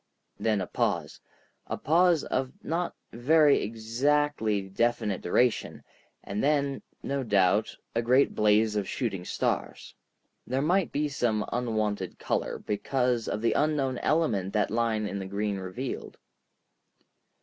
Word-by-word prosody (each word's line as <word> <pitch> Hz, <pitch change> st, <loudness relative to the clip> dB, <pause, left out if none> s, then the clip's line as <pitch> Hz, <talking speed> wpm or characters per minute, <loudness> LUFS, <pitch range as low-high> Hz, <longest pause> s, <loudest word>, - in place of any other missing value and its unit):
Then 110 Hz, -3 st, +1 dB
a -, -, -2 dB
pause—a -, -, -4 dB
pause 170 Hz, +1 st, +3 dB
of 130 Hz, 0 st, -2 dB
not 170 Hz, +2 st, -2 dB, 0.2 s
very 145 Hz, +4 st, +4 dB
exactly 115 Hz, 0 st, 0 dB
definite 105 Hz, 0 st, 0 dB
duration—and 105 Hz, -1 st, -2 dB
then, 140 Hz, -1 st, +1 dB, 0.2 s
no 140 Hz, 0 st, -1 dB
doubt, 105 Hz, -2 st, +2 dB, 0.2 s
a 115 Hz, -, +1 dB
great 125 Hz, +4 st, +3 dB
blaze 105 Hz, +1 st, +3 dB
of 100 Hz, -2 st, -1 dB
shooting 105 Hz, -8 st, -2 dB
stars. -, -, -2 dB, 0.5 s
They 130 Hz, +2 st, 0 dB
might 175 Hz, +5 st, +2 dB
be 150 Hz, +1 st, 0 dB
of 145 Hz, -, -3 dB
some 115 Hz, -6 st, 0 dB
unwonted 110 Hz, -6 st, -1 dB
color -, -, -2 dB
because 125 Hz, +2 st, -1 dB
of 105 Hz, -, -2 dB
the 115 Hz, -, +3 dB
unknown 140 Hz, -4 st, +1 dB
element 110 Hz, -, +1 dB
that 105 Hz, -2 st, +1 dB
line 115 Hz, -1 st, 0 dB
in 100 Hz, 0 st, -4 dB
the 95 Hz, -, -5 dB
green 100 Hz, +1 st, -2 dB
revealed. 95 Hz, +8 st, -5 dB
115 Hz, 125 wpm, -28 LUFS, 105-140 Hz, 0.5 s, very